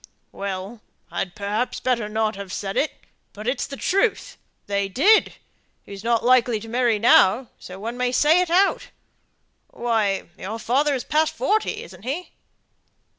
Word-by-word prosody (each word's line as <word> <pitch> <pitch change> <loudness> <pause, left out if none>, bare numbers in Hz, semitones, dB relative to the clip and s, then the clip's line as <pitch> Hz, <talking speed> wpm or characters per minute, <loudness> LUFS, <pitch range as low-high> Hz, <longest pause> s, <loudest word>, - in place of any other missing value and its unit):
"Well 200 +3 -6 0.3
I'd 180 0 -3
perhaps 210 +4 -2
better 235 -4 -1
not 220 0 0
have 200 -1 -8
said 195 0 -4
it, 310 - +1 0.4
but 210 +2 -8
it's 250 0 -1
the 275 - -8
truth; 395 - 0 0.3
they 200 -1 -1
did. 385 - +4 0.5
He's 200 0 -10
not 235 0 +1
likely 245 -3 +4
to 225 - -10
marry 240 -1 +1
now, 220 +2 +4
so 185 +1 -10
one 230 +4 -5
may 250 0 0
say 305 +7 +4
it 360 - -1
out. 380 +3 +2 0.8
Why, 220 -5 0 0.2
your 210 +4 -5
father 275 +6 +1
is 255 - -3
past 310 +1 +1
forty, 430 - 0
isn't 480 - -13
he?" 280 - -4
235 Hz, 155 wpm, -23 LUFS, 205-275 Hz, 0.8 s, did